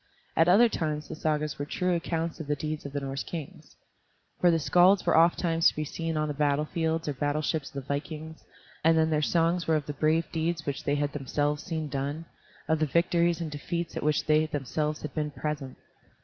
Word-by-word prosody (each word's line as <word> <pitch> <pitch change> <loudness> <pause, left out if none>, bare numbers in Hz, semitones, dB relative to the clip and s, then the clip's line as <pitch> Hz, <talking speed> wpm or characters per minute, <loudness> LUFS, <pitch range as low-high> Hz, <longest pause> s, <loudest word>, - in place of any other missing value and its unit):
At 165 - +4
other 205 +7 +7
times 155 -7 -2
the - - -6
Sagas 150 -2 -1
were 145 - -2
true 180 +4 0
accounts 165 0 -2
of 160 - -6
the 145 - +1
deeds 155 0 -4
of 140 - -11
the 145 - -1
Norse 135 0 -3
kings. 160 -5 -8 0.6
For 180 - +5
the 165 - +4
skalds 180 +5 +4
were 170 - +3
ofttimes 165 0 +4
to - - +2
be 155 - -2
seen 165 +1 -3
on 155 0 0
the 150 - -2
battle 145 0 +1
fields 160 0 -1
or 145 - 0
battleships 145 +2 -1
of - - -23
the 135 -1 -6
vikings, 155 +2 -5 0.4
and 165 +1 +5
then 160 0 +3
their 150 -1 +2
songs 170 +2 +1
were 160 - +3
of 150 -2 -1
the 145 - -4
brave 155 +3 +2
deeds 165 0 -1
which 140 -1 -4
they 145 - +2
had 145 0 -1
themselves 145 +1 -1
seen 160 -4 -3
done, 145 +3 -3 0.4
of 160 -1 +2
the 155 - +2
victories 170 +2 +2
and 160 -2 -4
defeats 170 +3 -4
at - - -3
which 150 -1 +1
they 155 0 +3
themselves 150 +1 -2
had 150 -2 -5
been 150 -1 -1
present. 150 -2 -5
155 Hz, 220 wpm, -28 LUFS, 145-165 Hz, 0.6 s, other